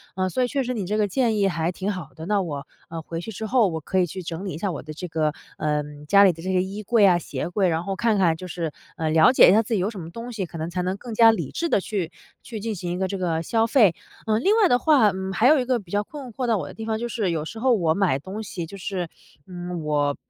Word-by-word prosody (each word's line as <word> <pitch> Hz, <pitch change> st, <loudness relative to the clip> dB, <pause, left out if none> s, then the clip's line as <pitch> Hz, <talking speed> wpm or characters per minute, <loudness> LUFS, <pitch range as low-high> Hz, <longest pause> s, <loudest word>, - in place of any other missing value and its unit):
呃， 185 Hz, 0 st, 0 dB
所 255 Hz, +7 st, 0 dB
以 -, -, +1 dB
确 275 Hz, +1 st, -1 dB
实 250 Hz, 0 st, -2 dB
你 210 Hz, -6 st, -3 dB
这 210 Hz, +4 st, -1 dB
个 210 Hz, -1 st, +2 dB
建 230 Hz, 0 st, +1 dB
议 200 Hz, -1 st, +3 dB
还 165 Hz, -2 st, -1 dB
挺 190 Hz, +3 st, -3 dB
好 180 Hz, -7 st, -7 dB
的， 160 Hz, -, -8 dB
那 205 Hz, +1 st, +1 dB
我， 145 Hz, -6 st, -5 dB, 0.2 s
呃， 165 Hz, 0 st, -5 dB
回 165 Hz, +1 st, -6 dB
去 225 Hz, -, -7 dB
之 220 Hz, +1 st, -5 dB
后， 235 Hz, -1 st, +3 dB
我 160 Hz, -3 st, -3 dB
可 190 Hz, +5 st, -1 dB
以 180 Hz, -, +4 dB
去 185 Hz, +3 st, -7 dB
整 170 Hz, +2 st, -6 dB
理 190 Hz, -, -4 dB
一 -, -, -5 dB
下 195 Hz, +3 st, -2 dB
我 160 Hz, -, -5 dB
的 155 Hz, -, -8 dB
这 180 Hz, +4 st, -6 dB
个 155 Hz, -2 st, 0 dB, 0.2 s
呃， 150 Hz, -1 st, 0 dB, 0.2 s
家 200 Hz, +5 st, +7 dB
里 195 Hz, -, +6 dB
的 165 Hz, -1 st, -11 dB
这 190 Hz, +1 st, -1 dB
个 185 Hz, -, +3 dB
衣 195 Hz, +3 st, -5 dB
柜 230 Hz, 0 st, +3 dB
呀、 185 Hz, -3 st, +6 dB
鞋 175 Hz, -, -4 dB
柜， 190 Hz, +1 st, +1 dB
然 165 Hz, 0 st, -1 dB
后 195 Hz, +1 st, -3 dB
看 225 Hz, +1 st, +1 dB
看 175 Hz, -4 st, +3 dB
就 185 Hz, -, -8 dB
是 165 Hz, -2 st, -3 dB, 0.3 s
呃， 160 Hz, -1 st, -1 dB
了 160 Hz, +4 st, +6 dB
解 260 Hz, -, +7 dB
一 -, -, +6 dB
下 220 Hz, -, +5 dB
自 225 Hz, -, -3 dB
己 210 Hz, -, +2 dB
有 185 Hz, +3 st, 0 dB
什 215 Hz, -4 st, -8 dB
么 165 Hz, -1 st, -7 dB
东 230 Hz, +5 st, -7 dB
西， 210 Hz, -5 st, -3 dB
可 170 Hz, -, -9 dB
能 160 Hz, +1 st, -3 dB
才 180 Hz, +1 st, -2 dB
能 185 Hz, +1 st, -1 dB
更 235 Hz, +2 st, -8 dB
加 225 Hz, +1 st, +7 dB
理 220 Hz, -, -3 dB
智 335 Hz, -, -2 dB
地 -, -, +3 dB
去 185 Hz, -4 st, -3 dB, 0.3 s
去 225 Hz, -3 st, -7 dB
进 220 Hz, +1 st, -3 dB
行 175 Hz, -1 st, -4 dB
一 175 Hz, -, -2 dB
个 190 Hz, +1 st, 0 dB
这 195 Hz, -, -3 dB
个 170 Hz, -3 st, -1 dB
消 225 Hz, +4 st, +1 dB
费。 215 Hz, -, +4 dB, 0.3 s
呃， 215 Hz, -1 st, +3 dB
另 390 Hz, -, +3 dB
外 400 Hz, -, +6 dB
的 245 Hz, -, +5 dB
话 265 Hz, -6 st, +5 dB
嗯， 190 Hz, 0 st, -4 dB
还 225 Hz, +5 st, +3 dB
有 300 Hz, +1 st, +6 dB
一 250 Hz, -, -1 dB
个 250 Hz, -1 st, +1 dB
比 185 Hz, -5 st, -15 dB
较 205 Hz, 0 st, +1 dB
困 270 Hz, +2 st, -9 dB
惑 255 Hz, +3 st, -3 dB
到 225 Hz, -2 st, +2 dB
我 -, -, -4 dB
的 -, -, -9 dB
地 225 Hz, -, -7 dB
方， 220 Hz, -1 st, -1 dB
就 240 Hz, -, -2 dB
是 215 Hz, -6 st, -1 dB
有 155 Hz, -2 st, -2 dB
时 220 Hz, +7 st, -7 dB
候 255 Hz, +1 st, +3 dB
我 170 Hz, -8 st, +2 dB
买 180 Hz, -7 st, +1 dB
东 195 Hz, +8 st, -6 dB
西 180 Hz, -4 st, -5 dB
就 195 Hz, +5 st, -10 dB
是， 185 Hz, -2 st, -3 dB, 0.4 s
嗯， 175 Hz, -1 st, -6 dB
我 145 Hz, -1 st, +1 dB
190 Hz, 335 characters per minute, -24 LUFS, 170-220 Hz, 0.4 s, 家